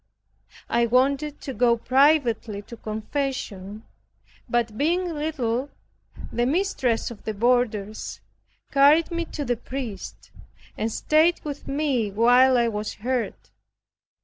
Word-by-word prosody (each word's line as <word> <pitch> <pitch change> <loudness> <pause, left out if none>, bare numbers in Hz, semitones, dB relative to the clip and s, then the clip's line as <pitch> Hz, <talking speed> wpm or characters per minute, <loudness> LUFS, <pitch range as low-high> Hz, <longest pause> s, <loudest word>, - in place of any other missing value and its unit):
I 235 0 +2
wanted 275 +5 +1
to 270 - -5
go 235 +1 +3
privately 250 -6 +2
to 235 - -10
confession, 215 -3 -4 0.7
but 235 -2 0
being 345 +7 0
little, 280 -4 -2 0.6
the 240 0 0
mistress 265 - 0
of 225 - -11
the 220 - -4
boarders 220 -2 0 0.5
carried 290 +5 +5
me 335 0 -2
to 295 -2 -5
the 245 -1 0
priest, 245 -4 -7 0.4
and 225 +1 -2
stayed 315 +8 +3
with 290 -2 -6
me 275 -6 0
while 245 +5 +5
I 235 -1 +3
was 210 -1 -3
heard. 245 +2 -2
245 Hz, 120 wpm, -24 LUFS, 225-285 Hz, 0.7 s, carried